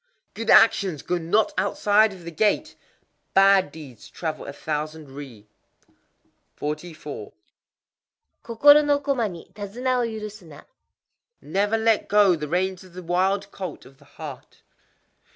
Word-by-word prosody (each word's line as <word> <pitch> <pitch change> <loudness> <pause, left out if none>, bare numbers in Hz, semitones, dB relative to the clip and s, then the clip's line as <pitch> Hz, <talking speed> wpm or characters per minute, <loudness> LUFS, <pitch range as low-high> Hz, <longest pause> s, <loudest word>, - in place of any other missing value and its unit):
_ - - -48
Good 225 0 -5
actions 195 -8 +5
go 180 - -1
not 175 +7 +1
outside 205 +2 +3
of 185 -3 -12
the 170 - -7
gate: 205 +6 0 0.6
bad 195 -4 +5
deeds 140 -7 -12
travel 160 -2 -5
a - - -5
thousand 155 0 -5
ri. 130 -7 -11 1.1
44.—Kokoro 155 - -1
no 290 -1 +2
koma 270 -6 -1
ni 170 -3 -11
tadzuna 235 +6 -2
wo - - +1
yuru 215 -2 -6
suna. 175 -8 -14 0.7
Never 205 +7 0
let 225 -1 +1
go 205 -3 +4
the 150 -2 -5
reins 185 +3 -1
of 185 -2 -17
the 185 0 -9
wild 190 +3 0
colt 190 -2 -7
of 135 +1 -18
the 140 - -20
heart. 145 -3 -11
185 Hz, 135 wpm, -24 LUFS, 155-210 Hz, 1.1 s, actions